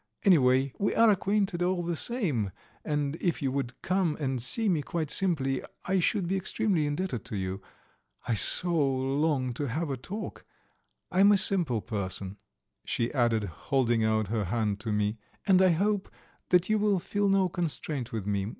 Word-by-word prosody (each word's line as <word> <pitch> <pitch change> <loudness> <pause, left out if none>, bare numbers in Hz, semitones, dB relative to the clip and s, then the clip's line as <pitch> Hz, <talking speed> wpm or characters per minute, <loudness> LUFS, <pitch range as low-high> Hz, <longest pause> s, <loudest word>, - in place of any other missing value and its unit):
Anyway, 135 - +4
we 200 - 0
are 230 -1 +6
acquainted 195 -2 0
all 180 0 0
the 170 0 -2
same, 160 - 0 0.3
and 145 0 -2
if 175 -2 -1
you 135 -2 -1
would 130 -2 -4
come 185 -4 0
and 135 -4 -2
see 220 - +1
me 170 -6 +2
quite 155 +1 -3
simply 140 -9 +1 0.2
I 190 +1 +1
should 185 +1 +1
be 190 - 0
extremely 190 -4 0
indebted 145 - -2
to 115 -2 -5
you. 95 0 -4 0.7
I 120 - +1
so 175 - +3
long 135 0 0
to 145 +4 -3
have 150 +5 -2
a 135 - -3
talk. 205 - -7 0.7
I 185 - 0
am 200 +1 +7
a 205 - +5
simple 170 - +2
person," 100 -2 -4 0.5
she 115 +1 -2
added, 120 -5 +2
holding 120 - 0
out 110 -2 +1
her 110 -2 -1
hand 105 0 -1
to 110 0 -4
me, 105 +1 -1 0.3
"and 190 -1 +5
I 190 - +5
hope 200 +4 0 0.4
that 180 0 +4
you 215 0 +2
will 205 -1 +2
feel 200 +3 -1
no 195 -1 +3
constraint 155 -7 -3
with 110 -4 -4
me. 100 -1 -1
145 Hz, 175 wpm, -28 LUFS, 120-185 Hz, 0.7 s, am